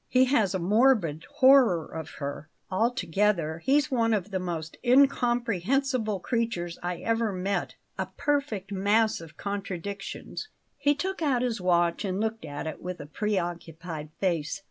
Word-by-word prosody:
He 255 0 +5
has 220 -8 +2
a - - +2
morbid 195 - +3
horror 255 - +5
of 160 -1 -7
her. 145 +1 -5 0.2
Altogether, 190 - +1
he's 275 - +2
one 230 -3 +2
of 205 0 -3
the 190 - -1
most 165 -3 -4
incomprehensible 245 -3 +2
creatures 225 -8 -2
I 175 0 -2
ever 230 -1 +1
met 195 +1 -2 0.2
a - - -1
perfect 275 -10 -2
mass 205 +1 +2
of 160 -1 -12
contradictions." 200 - -5 0.3
He 290 +1 +3
took 380 +4 -3
out 265 -6 +2
his 235 -5 -1
watch 175 0 +2
and 190 -1 -2
looked 220 -2 -2
at 145 0 -5
it 155 - -5
with 180 -1 -5
a 145 - -7
preoccupied 170 -4 -3
face. 170 -2 -1
200 Hz, 145 wpm, -27 LUFS, 175-240 Hz, 0.3 s, He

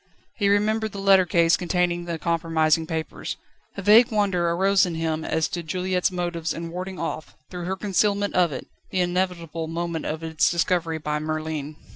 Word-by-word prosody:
He 200 -2 +2
remembered 215 +1 +1
the - - -6
letter 195 -2 +5
case 170 0 +4
containing 175 -1 0
the 170 -1 -3
compromising 165 -1 +1
papers. 160 -1 -4 0.4
A 195 - -4
vague 225 +5 +6
wonder 195 -5 +1
arose 190 +3 +3
in 175 -3 -1
him 160 -1 -2
as 160 0 0
to 175 - -3
Juliette's 180 +2 0
motives 175 -3 -3
in 165 0 -6
warding 185 +2 -5
off, 165 -2 -5 0.2
through 175 -1 -5
her 190 +2 -1
concealment 205 +1 0
of 175 -3 +3
it, 130 - -6 0.2
the 185 - 0
inevitable 175 -3 -2
moment 165 0 -3
of 160 +1 -4
its 160 0 +2
discovery 170 -1 0
by 150 -1 -2
Merlin. 155 -1 -4
175 Hz, 175 wpm, -24 LUFS, 160-190 Hz, 0.4 s, vague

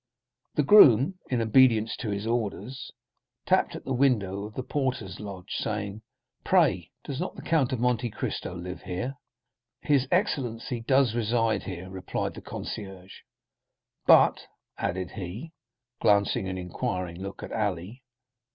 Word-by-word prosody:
The 150 - +3
groom, 145 - +7
in 120 -3 +1
obedience 115 -1 +4
to 115 - -4
his 100 +1 -3
orders, 115 +2 -3 0.5
tapped - - +2
at - - -8
the 135 - -1
window 105 -7 +1
of 105 - -10
the 130 - -3
porter's 125 -10 -2
lodge, 100 -3 -8
saying: 105 -1 -3 0.4
"Pray, 145 - +3
does 140 -1 -5
not 180 - -3
the - - -9
Count 150 -6 +2
of 130 - -1
Monte 120 0 +1
Cristo 90 - -4
live 90 0 -7
here?" 95 +9 -4 0.7
"His 140 -3 +2
excellency 125 - 0
does 130 0 +3
reside 115 -1 +1
here," 95 -1 -7
replied 95 -1 -4
the - - -9
concierge; 95 -3 -7 0.9
"but——" - - +6 0.3
added 90 -1 -3
he, 105 - -7 0.5
glancing 100 -1 +3
an 95 0 -3
inquiring 90 0 -4
look 100 0 -7
at - - -7
Ali. 105 +2 -2
110 Hz, 140 wpm, -27 LUFS, 95-130 Hz, 0.9 s, groom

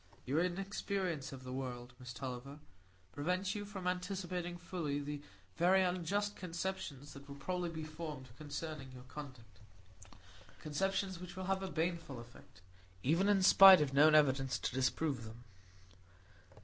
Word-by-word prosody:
"Your 140 +5 +1
inexperience 185 -4 -2
of 130 -1 -9
the 130 0 -6
world, 125 -2 -5
Miss 125 -1 -8
Tulliver, 130 +2 -6 0.5
prevents 180 +6 -1
you 205 -2 -4
from 200 -3 -7
anticipating 180 -1 -2
fully 170 -5 -3
the 145 0 -5 0.4
very 185 +2 +5
unjust 185 +3 0
conceptions 170 -6 -4
that 140 +1 -12
will 140 - -8
probably 180 +4 -2
be 160 -1 -5
formed 155 -4 -7
concerning 145 -1 -6
your 125 -1 -10
conduct,—conceptions 115 - -6
which 180 0 -8
will 185 0 -4
have 190 0 0
a 190 - -3
baneful 165 -6 -2
effect, 120 -5 -15 0.4
even 170 +8 +3
in 195 -2 +4
spite 195 0 +10
of 145 -3 0
known 155 +2 +7
evidence 135 -4 +4
to - - -3
disprove 130 0 0
them." 115 +2 -10
155 Hz, 140 wpm, -36 LUFS, 130-180 Hz, 0.5 s, spite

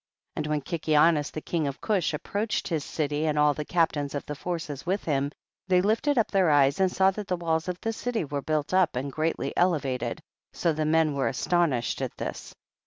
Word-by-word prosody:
And 150 - -2
when 150 -1 0
Kikianus 155 -1 +2
the 155 - -6
king 160 -3 -1
of 140 - -5
Cush 200 -6 0
approached 205 +8 -2
his 160 -5 -1
city 150 0 -1
and 150 -1 0
all 150 0 +4
the 150 - -4
captains 150 -4 0
of 140 - -4
the 150 - -4
forces 150 -2 -4
with 190 +4 -1
him, 140 -2 0 0.4
they 180 -1 +4
lifted 225 +9 +1
up 230 - +2
their 190 -4 +3
eyes 140 0 +4
and 190 -1 +3
saw 190 +1 +4
that 205 0 -6
the 180 - -1
walls 160 -1 -1
of 180 0 -3
the 225 - -1
city 230 -4 -2
were 145 0 -3
built 155 +2 -1
up 185 -6 +3
and 135 +3 -3
greatly 155 +3 -2
elevated, 145 -8 0 0.3
so 170 - +1
the 155 0 -1
men 160 -1 +3
were 140 -1 0
astonished 140 -4 0
at - - -4
this. - - -6
160 Hz, 210 wpm, -27 LUFS, 145-180 Hz, 0.4 s, all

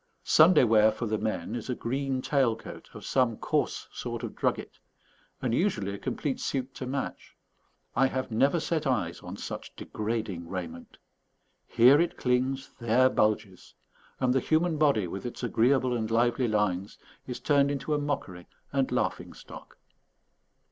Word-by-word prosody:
Sunday 155 -1 +6
wear 110 -2 +5
for 115 - -4
the 110 -1 -1
men 105 -3 -3
is 120 +1 -5
a 125 - 0
green 130 +2 -2
tail 130 -6 +2
coat 115 - -11
of - - -9
some 125 -4 +1
coarse - - -1
sort - - -5
of - - -5
drugget, - - -2 0.6
and 120 -3 0
usually 110 - 0
a 100 - -6
complete 140 -3 -3
suit 130 -1 -3
to 130 - -6
match. 135 +1 -5 0.6
I 135 +1 +4
have 130 -1 -3
never 140 +9 +3
set 155 -2 -1
eyes 100 -10 -1
on - - -8
such - - -7
degrading 105 -6 -4
raiment. 85 -3 -7 0.7
Here 130 +6 +6
it 175 - -1
clings, 130 +2 0
there 120 +2 +3
bulges; 105 -3 -1 0.4
and 125 -1 +2
the 135 - +3
human 160 +4 +1
body, 140 -10 +3
with 95 +3 -6
its 120 0 -6
agreeable 125 +2 +2
and 110 -2 -2
lively 120 +2 +2
lines, 105 -2 -1 0.3
is 125 - -5
turned 140 -2 +3
into 145 +2 -2
a 150 - +1
mockery 100 -12 -4 0.3
and 135 -2 +1
laughing - - -1
stock. - - -12
125 Hz, 160 wpm, -28 LUFS, 110-135 Hz, 0.7 s, Sunday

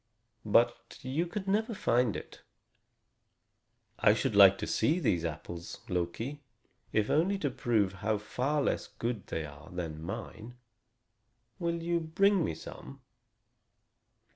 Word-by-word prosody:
But 120 +3 +2
you 140 +7 -1
could 195 +2 -5
never 220 +3 +1
find 120 - +2
it." - - -8 1.6
"I - - +5
should - - -1
like - - +8
to - - -3
see 160 - +2
these 90 - +1
apples, 85 +1 -6
Loki, 105 +11 -2 0.5
if 105 -1 +1
only 180 +6 +3
to 145 -8 -1
prove 115 -6 +1
how 110 0 +1
far 135 +8 -1
less - - 0
good 115 -4 -4
they 80 - -3
are 75 +2 -12
than 80 -3 -5
mine. 110 +7 -7 1.0
Will 170 -1 -1
you 170 0 +1
bring 185 +4 +3
me 80 - -2
some?" - - -10
120 Hz, 130 wpm, -31 LUFS, -, 1.6 s, like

